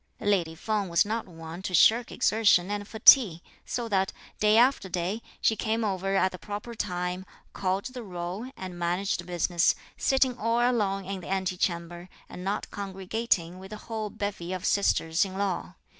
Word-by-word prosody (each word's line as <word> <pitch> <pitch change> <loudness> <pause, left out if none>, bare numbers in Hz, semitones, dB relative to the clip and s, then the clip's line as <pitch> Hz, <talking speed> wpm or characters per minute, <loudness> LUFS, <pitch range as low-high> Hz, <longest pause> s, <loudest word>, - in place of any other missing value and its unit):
Lady 180 -6 +1
Feng 205 +2 -2
was 170 +2 +3
not 220 +1 -3
one 165 0 -9
to 190 -1 -2
shirk 230 +7 +5
exertion 205 -4 +3
and 205 0 -3
fatigue, 220 - +6 0.3
so 240 -1 -2
that, 195 -3 +1 0.3
day 215 +1 +4
after 245 -5 +3
day, 180 +5 -2 0.2
she 220 - +3
came 225 +1 -1
over 195 -1 -1
at 190 -1 +3
the 180 - -9
proper 210 +3 -6
time, 180 -3 -3 0.3
called 190 +2 -1
the 255 0 -6
roll, 185 +3 -5
and 185 -2 -7
managed 175 +1 -1
business, 175 0 +2 0.2
sitting 265 -2 +2
all 230 +2 +1
alone 210 -6 +1
in 195 0 -4
the - - -10
ante 190 -1 -1
chamber, 175 0 -3 0.2
and 180 - -8
not 200 +2 -3
congregating 195 -2 -2
with 190 +1 -10
the 215 - -7
whole 215 -1 -5
bevy 195 -4 -4
of 185 - -4
sisters 165 -4 +2
in 190 -1 -5
law. 190 -2 -2
195 Hz, 175 wpm, -27 LUFS, 180-215 Hz, 0.3 s, fatigue